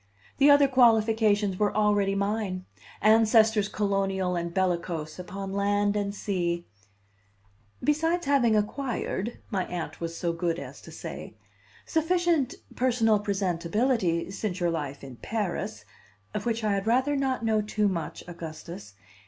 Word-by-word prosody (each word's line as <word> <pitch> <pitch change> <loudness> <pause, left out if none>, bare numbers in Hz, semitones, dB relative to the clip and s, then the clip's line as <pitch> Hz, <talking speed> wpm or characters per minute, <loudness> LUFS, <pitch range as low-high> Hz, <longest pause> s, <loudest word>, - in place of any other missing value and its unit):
The 285 +1 +7
other 285 -1 +7
qualifications 220 -5 +3
were 205 -1 +1
already 205 -2 +2
mine: 200 -2 -2 0.4
ancestors 220 -1 +5
colonial 195 -3 0
and 170 0 -2
bellicose 170 -3 -1
upon 195 +2 -6
land 205 +1 +1
and 200 -1 -1
sea 175 -4 -2 0.6
" 100 0 -31
besides 325 +3 +1
having 255 -6 +3
acquired," 230 -1 -2
my 190 -3 -1
Aunt 175 -2 -5
was 165 0 -4
so 170 -1 -1
good 165 0 -1
as - - -8
to - - -12
say, - - -8 0.5
"sufficient 330 -4 +1 0.2
personal 230 -4 +3
presentability 190 0 0
since 200 -2 -3
your 175 -1 +1
life 145 -4 -4
in 130 -3 -9
Paris, 185 - -3 0.5
of - - -3
which 230 -1 -1
I 210 - +1
had 200 +1 -1
rather 260 +5 +2
not 265 -4 -1
know 220 -1 +2
too 210 0 0
much, 170 -5 -3
Augustus. 165 - -8
205 Hz, 135 wpm, -27 LUFS, 175-225 Hz, 0.6 s, The